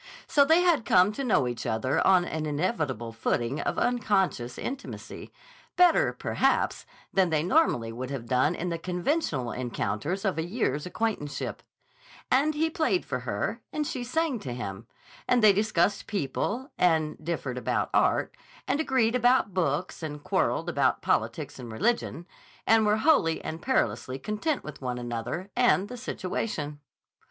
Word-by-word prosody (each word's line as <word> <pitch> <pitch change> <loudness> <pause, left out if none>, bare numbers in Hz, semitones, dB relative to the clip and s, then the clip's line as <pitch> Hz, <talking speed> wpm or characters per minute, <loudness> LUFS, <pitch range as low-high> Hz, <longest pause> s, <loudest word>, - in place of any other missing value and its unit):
So 285 - +4
they 320 +5 +5
had 340 -9 +3
come 185 +1 +4
to 275 +6 -4
know 210 - +2
each 120 -2 -4
other 110 +5 0
on 185 -2 +5
an 155 -2 -3
inevitable 145 - -2
footing 120 +4 -1
of - - -2
unconscious 195 - 0
intimacy, 270 +1 -7 0.4
better, 360 +8 +5
perhaps, - - 0 0.3
than 190 -2 +3
they 155 -2 +1
normally 175 - +2
would 125 +3 -5
have 135 -4 -5
done 125 +1 +2
in 180 - -3
the 165 -1 -3
conventional 175 - -1
encounters 125 - -3
of 190 -4 0
a - - 0
year's 175 - -1
acquaintanceship; 180 -7 -3 0.7
and 290 +4 +3
he 320 +2 +2
played 325 +3 0
for - - -3
her - - -3
and 300 - -2
she 255 -3 -3
sang 280 0 -1
to 125 -9 -5
him; 110 -2 -6 0.4
and 245 -2 +3
they 210 -2 +8
discussed 205 -1 +1
people 210 - -2
and 160 -3 +2
differed 145 -6 -3
about - - -1
art, - - +2 0.3
and 285 - +1
agreed 260 -7 +2
about 245 -4 +3
books 170 -1 -1
and 150 -2 -6
quarreled - - 0
about - - +1
politics - - -1
and 120 -2 -8
religion, 175 - -1 0.4
and 220 -1 +4
were 210 +1 +3
wholly 220 - +3
and 160 +1 -5
perilously 185 - 0
content 215 - -2
with 150 - -9
one 125 -1 -3
another 120 - -4
and 240 -5 +3
the 250 - -6
situation. 185 - -4
180 Hz, 155 wpm, -27 LUFS, -, 0.7 s, they